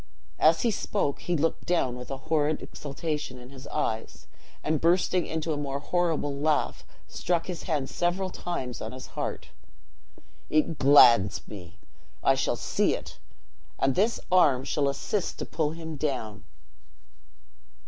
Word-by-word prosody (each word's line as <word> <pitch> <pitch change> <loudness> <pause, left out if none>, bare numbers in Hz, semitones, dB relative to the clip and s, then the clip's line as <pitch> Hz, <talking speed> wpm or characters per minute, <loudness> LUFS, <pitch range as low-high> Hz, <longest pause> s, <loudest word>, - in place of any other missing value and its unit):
As 160 +1 +5
he 235 - +3
spoke, 195 -7 -1
he 175 -1 -1
looked 160 +2 -1
down, 150 -8 +1
with 125 0 -8
a 135 - -3
horrid 155 +1 0
exultation 150 -2 -4
in 125 +1 -12
his 135 0 -11
eyes; 110 -7 -3 0.4
and, 155 0 0
bursting 175 +1 +2
into 160 0 -2
a - - -3
more 140 -1 -2
horrible 160 -2 0
laugh, 150 +1 0 0.2
struck 170 -2 -1
his 180 -3 -5
hand 145 -4 0
several 185 +2 -1
times 130 -11 -4
on - - -5
his 130 - -8
heart: - - -4 1.0
"It 155 0 +1
glads 120 -8 +6
me! 90 -3 -10 0.5
I - - +5
shall - - 0
see - - +1
it - - -10 0.6
and 135 0 +2
this 215 - +2
arm 145 -8 +5
shall 140 0 0
assist 170 +8 -2
to - - -4
pull 155 -2 -1
him 160 -1 -6
down." 110 -8 -3
150 Hz, 150 wpm, -27 LUFS, 135-165 Hz, 1.0 s, glads